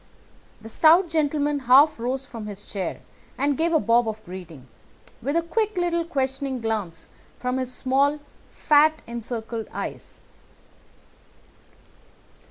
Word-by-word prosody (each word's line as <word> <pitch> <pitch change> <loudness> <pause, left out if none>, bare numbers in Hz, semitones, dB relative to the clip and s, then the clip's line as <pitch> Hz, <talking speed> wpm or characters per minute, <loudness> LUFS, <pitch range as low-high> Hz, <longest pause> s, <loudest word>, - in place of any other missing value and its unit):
The 220 - -10
stout 330 - +5
gentleman 295 -2 +1
half 270 +3 +5
rose 260 +3 -2
from 225 -4 -8
his 205 -1 -8
chair 195 -2 -4 0.4
and 285 0 +1
gave 330 +3 +1
a 320 - +4
bob 230 -2 +3
of 215 0 -8
greeting, 175 -7 -10 0.6
with 280 +6 -2
a 335 - +2
quick 425 +4 -1
little 340 -1 0
questioning 270 -3 -2
glance 210 -8 -3 0.3
from 250 +1 -2
his 255 -1 -3
small 275 +3 +1 0.3
fat 310 +1 +3
encircled 230 -1 -5
eyes. - - -7
265 Hz, 125 wpm, -24 LUFS, 225-305 Hz, 0.6 s, stout